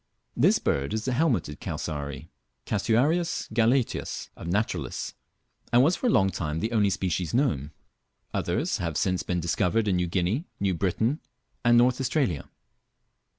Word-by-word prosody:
This - - +4
bird 70 +9 -1
is 110 - -3
the 130 - 0
helmeted 120 - 0
cassowary 70 +1 -5 0.3
(Casuarius 135 - +1
galeatus) 115 +2 +1
of - - -8
naturalists, 90 - -2 0.6
and 120 +1 +6
was 165 +6 +4
for 255 - -1
a - - +4
long 95 - +3
time 80 -4 -3
the 110 +7 -2
only 105 -3 +3
species 90 -2 -1
known. 120 - +1 0.6
Others - - -1
have 85 -4 -2
since 90 -1 +1
been 90 -1 -1
discovered 90 +6 +1
in 95 -3 +2
New 90 0 0
Guinea, 95 - 0
New 100 -2 +1
Britain, 110 - 0 0.4
and 120 -1 +5
North 125 +2 +4
Australia. 125 - 0
100 Hz, 150 wpm, -27 LUFS, 85-120 Hz, 0.6 s, and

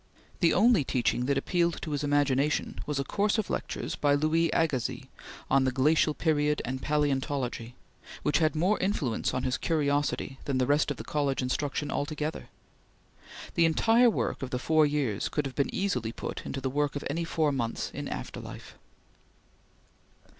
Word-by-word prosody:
The 170 - +4
only 215 -4 +4
teaching 125 -1 0
that 140 -1 +2
appealed 170 +4 0
to 155 - -4
his 145 0 -2
imagination 145 0 +1
was 150 -1 -1
a - - +1
course 205 +9 0
of 220 - -2
lectures - - -3
by 145 -1 +2
Louis 160 +3 +2
Agassiz 145 -7 0 0.4
on 135 0 +3
the 130 - +1
Glacial 150 +3 +3
Period 150 -2 +1
and 130 +1 -4
Paleontology, 135 -5 -1 0.5
which - - +2
had 155 -1 +2
more 185 +7 +2
influence 155 - 0
on 130 - -2
his 130 -1 -1
curiosity 145 -3 0
than 140 -2 0
the 130 - +2
rest 145 +3 +2
of - - -3
the - - -6
college 140 -3 -1
instruction 145 +3 -2
altogether. 150 +1 -3 1.0
The 170 - +4
entire 225 +9 +4
work 220 - -2
of 130 - -4
the 125 - -2
four 155 +3 +3
years 140 -8 -1
could 150 - -1
have 135 - -4
been 140 - 0
easily 125 - -1
put - - -6
into 135 - -4
the 130 - -1
work 145 +1 0
of 145 - -4
any 165 +4 -2
four 160 -2 +1
months 120 -4 -2
in - - -5
after - - -5
life. - - -10
145 Hz, 175 wpm, -28 LUFS, 135-160 Hz, 1.0 s, The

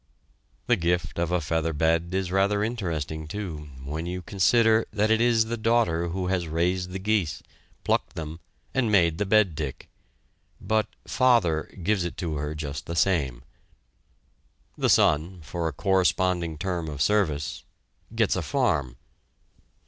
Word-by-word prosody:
The - - +3
gift 85 -2 -1
of 85 0 0
a 90 - +2
feather 80 +1 -1
bed 80 +3 +1
is 95 -1 -1
rather 100 +2 +2
interesting, 80 - -3
too, 80 -6 -6 0.2
when 80 +4 -4
you 90 0 -4
consider 110 +3 +3
that 105 0 +1
it 110 +1 +3
is 115 -2 +4
the 115 +1 -3
daughter 110 -7 +1
who 90 +2 -3
has 90 -2 -1
raised 90 +3 0
the 95 - -4
geese, 95 -5 -1 0.4
plucked - - 0
them, 80 0 -6 0.3
and 120 -5 +1
made 85 -5 +3
the 105 - 0
bed 100 -5 +3
tick. 75 -4 -5 0.7
But 110 +2 0 0.2
"father" 110 - +2
gives 100 0 +1
it 85 - -5
to 80 -4 -3
her 75 +1 -3
just 75 -3 -5
the 85 - -4
same. 70 -10 +1 1.3
The - - 0
son, 85 +4 +3
for 85 +3 -3
a - - -1
corresponding 90 -1 +1
term 90 -1 -3
of 75 -2 -6
service, 85 -9 0 0.5
gets - - +2
a - - -1
farm. 65 -4 0
90 Hz, 150 wpm, -26 LUFS, 80-100 Hz, 1.3 s, is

